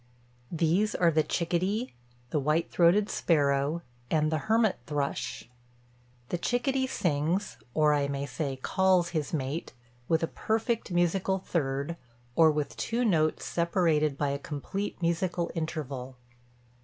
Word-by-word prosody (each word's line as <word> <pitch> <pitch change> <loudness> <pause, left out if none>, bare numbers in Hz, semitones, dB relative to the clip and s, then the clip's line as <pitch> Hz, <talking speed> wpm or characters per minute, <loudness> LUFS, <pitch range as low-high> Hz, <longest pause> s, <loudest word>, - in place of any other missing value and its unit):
These 170 +6 +1
are 170 -2 +4
the 155 0 +3
chickadee, 185 +9 -1 0.4
the 150 - +1
white 150 +4 +1
throated 180 +4 +4
sparrow, 145 -1 +1 0.3
and 155 -1 +2
the 155 - +1
hermit 220 -2 +3
thrush. 140 - -3 0.8
The 175 - -1
chickadee 260 +5 0
sings, 175 - -1 0.2
or 150 -1 +4
I 145 -1 +1
may 140 0 -2
say, 140 -2 -3
calls 185 +5 +2
his 155 -4 -2
mate, 145 +1 -3 0.3
with 165 0 +2
a - - +2
perfect 225 +1 -1
musical 180 +2 +1
third, 145 -3 -2 0.4
or 160 -1 +7
with 150 -1 -1
two 240 +2 0
notes 155 -7 +2
separated 165 -4 +1
by 145 -1 0
a 140 0 -2
complete 155 +8 -4
musical 170 +1 0
interval. 140 -6 -4
165 Hz, 130 wpm, -29 LUFS, 145-185 Hz, 0.8 s, or